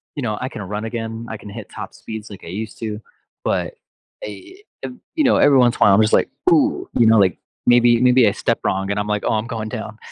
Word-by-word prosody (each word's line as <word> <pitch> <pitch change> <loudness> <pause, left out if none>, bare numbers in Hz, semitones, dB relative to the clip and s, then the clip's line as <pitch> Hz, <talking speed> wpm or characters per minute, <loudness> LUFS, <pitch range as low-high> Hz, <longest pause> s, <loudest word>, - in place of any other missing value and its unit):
you 145 - -4
know, 105 -3 -2
I 125 - -3
can 110 - -8
run 105 +3 -5
again, 115 0 -5
I 110 - -5
can 105 - -11
hit 100 - -8
top - - -8
speeds 110 -1 -8
like 100 - -11
I - - -8
used 105 +4 -6
to, 110 -1 -5 0.4
but, - - -1 0.5
a 235 - -10 0.2
ev 250 - -6 0.2
you 310 - +2
know, 265 - +4
every 140 -2 +5
once 120 -2 +4
in - - -20
while, 100 - +6
I'm - - +4
just 110 - +1
like, - - +3 0.2
"Ooh" 325 +4 +2
you 115 - +3
know, 110 0 +6
like, 95 -4 +3 0.3
"Maybe 120 -1 +5
Maybe 125 -2 +5
I - - -3
stepped - - -1
wrong," 95 +1 -1
and 100 - -2
I'm 105 - -2
like, 105 -1 -1
"Oh, - - +1
I'm 110 +1 -1
going 115 -2 -4
down." 110 -2 -6
110 Hz, 255 wpm, -20 LUFS, 105-125 Hz, 0.5 s, while